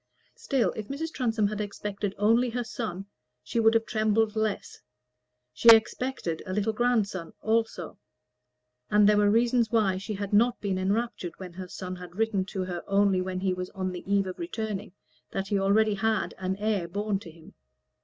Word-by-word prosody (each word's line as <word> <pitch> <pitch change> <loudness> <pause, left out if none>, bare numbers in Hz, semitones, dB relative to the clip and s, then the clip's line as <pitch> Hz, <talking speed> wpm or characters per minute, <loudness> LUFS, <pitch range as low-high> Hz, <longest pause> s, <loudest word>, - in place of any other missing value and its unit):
Still, 265 -3 0
if 215 -1 -5
Mrs. 315 +4 -4
Transome 225 -5 +1
had 210 0 -3
expected 205 -1 -4
only 230 +5 +3
her 245 +1 -2
son, 215 -6 -5 0.4
she 180 - -2
would 225 0 +4
have 225 0 +3
trembled 220 0 +1
less; 220 -1 -2 0.7
she 180 - +5
expected 225 -5 +4
a 185 - -3
little 210 +2 0
grandson 210 -7 0
also: 220 - -1 0.9
and 210 -1 +5
there 210 0 +5
were 205 0 +4
reasons 235 +1 +3
why 210 -5 +2
she 210 +2 -5
had 200 +1 -5
not 235 +4 +4
been 195 -2 -1
enraptured 195 -2 -1
when 185 -2 -9
her 185 +1 -7
son 185 0 -6
had 180 -1 -11
written 215 -3 0
to 190 -1 -4
her 175 -2 -5
only 195 -1 +3
when 185 0 -3
he 190 -1 +1
was 180 0 -4
on 185 -1 -2
the 180 - -7
eve 200 -1 +3
of 185 - -6
returning 220 - -4 0.4
that 195 0 -4
he 200 - +1
already 210 +2 +3
had 220 +2 0
an 190 0 -1
heir 205 -3 -1
born 205 +2 -1
to 175 - -11
him. 160 0 -16
205 Hz, 185 wpm, -27 LUFS, 190-225 Hz, 0.9 s, she